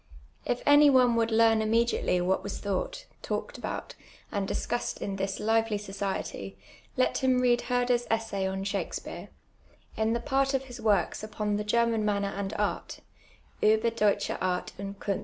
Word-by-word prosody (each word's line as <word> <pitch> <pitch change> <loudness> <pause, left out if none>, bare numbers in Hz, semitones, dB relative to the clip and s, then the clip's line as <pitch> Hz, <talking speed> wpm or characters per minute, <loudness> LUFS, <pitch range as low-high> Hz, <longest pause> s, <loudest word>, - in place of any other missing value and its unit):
If 245 - -1
any 290 0 +7
one 250 -3 +5
would 230 0 +2
learn 225 0 +4
immediately 225 -4 +1
what 185 +2 +1
was 200 - -5
thoup:ht, 200 -2 -3 0.2
talked - - -4
about, - - -5 0.4
and 200 -1 -1
discussed 240 +4 -2
in 195 -1 -3
this 195 0 -2
lively 225 0 +1
society, 195 - -4 0.4
let 255 - +2
him 260 -1 +3
read 245 -1 +3
Herder's 245 -1 +1
essay 220 -4 -1
on 190 0 -3
Shakspeare, 200 0 -4 0.7
in 220 +1 +1
the 235 - 0
part 270 +2 +1
of 270 - 0
his 250 -2 -10
works 205 -3 +1
upon 210 -1 -2
the 210 - -2
German 230 +1 +2
manner 200 -1 0
and 195 -1 -3
art 210 0 -2 0.3
( - - -31
Ueber 220 +2 +3
Deutsche 210 -3 +2
Art 180 -1 -1
unci 200 0 -5
Kifn. 200 -2 -1
220 Hz, 165 wpm, -28 LUFS, 200-235 Hz, 0.7 s, any